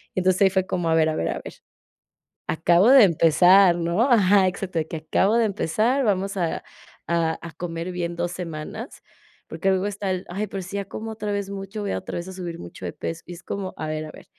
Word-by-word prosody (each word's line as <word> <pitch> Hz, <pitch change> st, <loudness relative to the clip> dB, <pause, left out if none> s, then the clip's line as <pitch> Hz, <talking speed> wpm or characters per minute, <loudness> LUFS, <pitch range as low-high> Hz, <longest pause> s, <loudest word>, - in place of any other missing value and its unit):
y -, -, +1 dB
entonces 185 Hz, 0 st, +2 dB
ahí 190 Hz, -, +6 dB
fue 190 Hz, 0 st, 0 dB
como 175 Hz, -3 st, -1 dB
a 160 Hz, -, +3 dB
ver 160 Hz, -1 st, +3 dB
a 155 Hz, -, -2 dB
ver 80 Hz, -, -1 dB
a -, -, -3 dB
ver, -, -, -9 dB, 0.9 s
acabo 175 Hz, +7 st, +4 dB
de 265 Hz, -5 st, +9 dB
empezar, 175 Hz, +2 st, +5 dB
¿no?, 170 Hz, +5 st, 0 dB
ajá, 200 Hz, -4 st, +5 dB
exacto, 185 Hz, -2 st, -4 dB
de 155 Hz, -, -3 dB
que 160 Hz, -, -4 dB
acabo 190 Hz, +8 st, +1 dB
de 230 Hz, -, +3 dB
empezar, 220 Hz, -, 0 dB
vamos 195 Hz, -1 st, 0 dB
a 170 Hz, -3 st, -1 dB, 0.5 s
a 165 Hz, 0 st, -1 dB
comer 170 Hz, 0 st, -4 dB
bien 175 Hz, -1 st, -3 dB
2 175 Hz, 0 st, -2 dB
semanas, 165 Hz, -4 st, -7 dB, 0.5 s
porque, 170 Hz, +4 st, -2 dB
luego 190 Hz, +1 st, +1 dB
está 200 Hz, -1 st, -3 dB
el: 185 Hz, 0 st, -3 dB
"Ay, 200 Hz, +4 st, -3 dB
pero 195 Hz, -1 st, -5 dB
si 190 Hz, +3 st, -6 dB
ya 200 Hz, -, -2 dB
como 220 Hz, +3 st, -6 dB
otra 210 Hz, -1 st, -4 dB
vez 200 Hz, -1 st, -3 dB
mucho, 195 Hz, +2 st, -6 dB
voy 200 Hz, -, -3 dB
a -, -, -1 dB
otra -, -, -6 dB
vez 175 Hz, +2 st, -6 dB
a -, -, -7 dB
subir 175 Hz, -3 st, -6 dB
mucho 85 Hz, +1 st, -10 dB
de 85 Hz, -, -3 dB
peso", 165 Hz, 0 st, -5 dB
y 175 Hz, -, -8 dB
es 175 Hz, +1 st, -10 dB
como, 195 Hz, -1 st, -5 dB
a -, -, -4 dB
ver 155 Hz, 0 st, -3 dB
a 155 Hz, -, -9 dB
ver -, -, -14 dB
185 Hz, 240 wpm, -24 LUFS, 170-200 Hz, 0.9 s, de